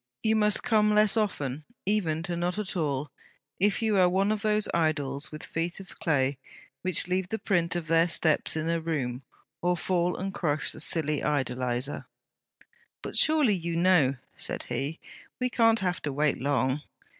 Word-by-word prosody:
You 220 Hz, 0 st, +3 dB
must 210 Hz, -1 st, +3 dB
come 210 Hz, -3 st, +3 dB
less 210 Hz, 0 st, +5 dB
often; 150 Hz, -, -1 dB, 0.2 s
even 175 Hz, -6 st, 0 dB
to 175 Hz, -1 st, -3 dB
not 175 Hz, +2 st, -2 dB
at 210 Hz, -3 st, -3 dB
all, 145 Hz, -4 st, -2 dB, 0.5 s
if 205 Hz, +4 st, +2 dB
you 215 Hz, -2 st, +2 dB
are 180 Hz, -1 st, +5 dB
one 195 Hz, +3 st, +1 dB
of 215 Hz, -1 st, -1 dB
those 215 Hz, -1 st, +1 dB
idols 150 Hz, -4 st, -1 dB
with 155 Hz, 0 st, -7 dB
feet 170 Hz, +2 st, -3 dB
of 190 Hz, -2 st, -12 dB
clay 135 Hz, -3 st, +1 dB, 0.4 s
which 185 Hz, -2 st, +3 dB
leave 185 Hz, 0 st, -1 dB
the 220 Hz, -, -2 dB
print 175 Hz, -6 st, 0 dB
of 175 Hz, -2 st, -2 dB
their 165 Hz, +1 st, +3 dB
steps 160 Hz, -3 st, +2 dB
in 155 Hz, 0 st, -2 dB
a 165 Hz, 0 st, +1 dB
room; 135 Hz, -6 st, -2 dB, 0.4 s
or 175 Hz, 0 st, +1 dB
fall 175 Hz, +1 st, 0 dB
and 195 Hz, +1 st, -4 dB
crush 150 Hz, -5 st, -1 dB
the -, -, -9 dB
silly 150 Hz, -3 st, +1 dB
idolizer.' 130 Hz, -2 st, -1 dB, 1.0 s
'But -, -, -6 dB
surely 305 Hz, -8 st, +4 dB
you 170 Hz, -2 st, -3 dB
know...' 170 Hz, -6 st, +3 dB, 0.2 s
said -, -, -2 dB
he. 150 Hz, +4 st, -3 dB, 0.4 s
'We 250 Hz, 0 st, -1 dB
can't 225 Hz, -1 st, +4 dB
have 180 Hz, -2 st, -1 dB
to 145 Hz, -, -3 dB
wait 150 Hz, +1 st, 0 dB
long.' 135 Hz, 0 st, 0 dB
170 Hz, 175 wpm, -27 LUFS, 150-200 Hz, 1.0 s, less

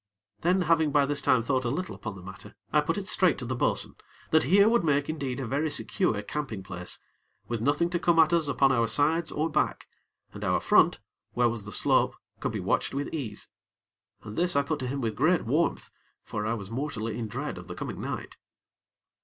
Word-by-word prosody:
Then, 180 Hz, +2 st, +2 dB
having 160 Hz, -2 st, +3 dB
by 145 Hz, -1 st, +4 dB
this 145 Hz, 0 st, 0 dB
time 125 Hz, -3 st, +3 dB
thought 130 Hz, +1 st, 0 dB
a 120 Hz, -, -1 dB
little 180 Hz, +9 st, -3 dB
upon 110 Hz, -3 st, -6 dB
the 95 Hz, -, -11 dB
matter, 95 Hz, +1 st, -11 dB, 0.2 s
I -, -, +5 dB
put -, -, -1 dB
it -, -, -4 dB
straight -, -, +3 dB
to -, -, -5 dB
the -, -, -2 dB
bo'sun -, -, 0 dB, 0.4 s
that 160 Hz, -2 st, +4 dB
here 200 Hz, +8 st, +5 dB
would 235 Hz, -2 st, +3 dB
make 145 Hz, -2 st, +1 dB
indeed 140 Hz, -5 st, -3 dB
a 135 Hz, -, -3 dB
very 145 Hz, +6 st, 0 dB
secure 145 Hz, -, +1 dB
camping 115 Hz, -6 st, -4 dB
place, 90 Hz, -2 st, -5 dB, 0.5 s
with 120 Hz, -2 st, -3 dB
nothing 145 Hz, +7 st, +1 dB
to 175 Hz, -, 0 dB
come 170 Hz, 0 st, +2 dB
at 160 Hz, +1 st, +5 dB
us 165 Hz, -3 st, +2 dB
upon 135 Hz, -1 st, +3 dB
our 115 Hz, -3 st, +2 dB
sides 155 Hz, +7 st, +2 dB
or 155 Hz, +2 st, 0 dB
back; 160 Hz, -, 0 dB, 0.5 s
and -, -, -8 dB
our -, -, +2 dB
front, -, -, +4 dB, 0.3 s
where 120 Hz, -1 st, +3 dB
was 110 Hz, -3 st, -5 dB
the 105 Hz, -, -7 dB
slope, -, -, +2 dB, 0.2 s
could -, -, -2 dB
be -, -, -3 dB
watched -, -, 0 dB
with 140 Hz, +1 st, -3 dB
ease. 125 Hz, -10 st, -5 dB, 0.7 s
And 110 Hz, -1 st, -8 dB
this 180 Hz, +1 st, +2 dB
I 140 Hz, -, +4 dB
put 150 Hz, +2 st, -2 dB
to 130 Hz, -, -3 dB
him 135 Hz, +2 st, -3 dB
with 110 Hz, -3 st, -2 dB
great 160 Hz, +5 st, +2 dB
warmth; 150 Hz, +9 st, 0 dB, 0.3 s
for 105 Hz, 0 st, -4 dB
I 115 Hz, -, 0 dB
was 100 Hz, -3 st, -8 dB
mortally 115 Hz, -4 st, -3 dB
in 115 Hz, -, -3 dB
dread 125 Hz, -1 st, -4 dB
of 90 Hz, -, -11 dB
the 90 Hz, -, -7 dB
coming -, -, -5 dB
night. -, -, -5 dB
140 Hz, 220 wpm, -28 LUFS, 115-160 Hz, 0.7 s, I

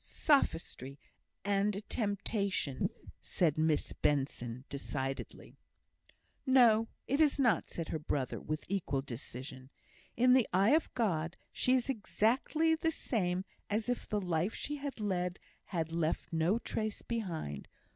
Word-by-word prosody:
"Sophistry 165 Hz, -, +1 dB, 0.5 s
and 200 Hz, 0 st, +2 dB
a 200 Hz, -, -4 dB
temptation," 200 Hz, -, -1 dB, 0.3 s
said 160 Hz, -5 st, +1 dB
Miss 155 Hz, -1 st, +1 dB
Benson, 130 Hz, -3 st, -1 dB
decidedly. 135 Hz, -1 st, -5 dB, 0.8 s
"No, 235 Hz, -4 st, +5 dB, 0.2 s
it 280 Hz, +4 st, +1 dB
is 300 Hz, -3 st, +4 dB
not," 230 Hz, -, +3 dB
said 165 Hz, -2 st, -4 dB
her 160 Hz, -, -2 dB
brother, 140 Hz, -3 st, -2 dB
with 155 Hz, 0 st, -4 dB
equal 165 Hz, -8 st, -1 dB
decision. 130 Hz, +1 st, -8 dB, 0.5 s
"In 250 Hz, +1 st, +6 dB
the 255 Hz, -3 st, +4 dB
eye 195 Hz, +4 st, +4 dB
of 315 Hz, +1 st, +2 dB
God, 175 Hz, -8 st, 0 dB, 0.2 s
she 255 Hz, -, +2 dB
is 250 Hz, -, +1 dB
exactly 270 Hz, +6 st, +1 dB
the 320 Hz, 0 st, +1 dB
same 190 Hz, -, -1 dB, 0.2 s
as 215 Hz, +3 st, 0 dB
if 245 Hz, -, -2 dB
the 210 Hz, -, +1 dB
life 180 Hz, +1 st, 0 dB
she 295 Hz, +1 st, -3 dB
has 280 Hz, -3 st, -5 dB
led 180 Hz, -3 st, -1 dB, 0.3 s
had 165 Hz, -3 st, -2 dB
left 165 Hz, 0 st, -1 dB
no 165 Hz, +6 st, +2 dB
trace 215 Hz, -2 st, -3 dB
behind. 170 Hz, -, -4 dB
195 Hz, 135 wpm, -33 LUFS, 155-235 Hz, 0.8 s, In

